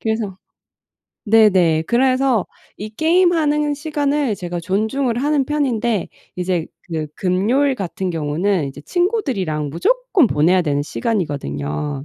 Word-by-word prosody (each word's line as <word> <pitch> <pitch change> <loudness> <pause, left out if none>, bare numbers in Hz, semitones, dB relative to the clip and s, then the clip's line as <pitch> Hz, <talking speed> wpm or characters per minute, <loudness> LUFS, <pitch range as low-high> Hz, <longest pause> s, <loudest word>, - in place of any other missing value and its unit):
그래서 220 -4 -2 0.9
네네. 190 -7 +4
그래서 255 -2 +2 0.3
이 210 +2 -7
게임하는 315 0 +2
시간을 290 -5 -1
제가 175 -1 -5
존중을 220 +7 -1
하는 290 -1 +2
편인데 240 - -1 0.3
이제 180 -2 -1 0.2
그 160 -3 -4
금요일 230 +10 +1
같은 190 -3 -4
경우는 165 +2 0
이제 140 +2 -10
친구들이랑 235 - -1
무조건 420 - +2
보내야 175 +5 +3
되는 145 -2 0
시간이거든요. 145 - -3
215 Hz, 290 characters per minute, -19 LUFS, 170-280 Hz, 0.9 s, 네네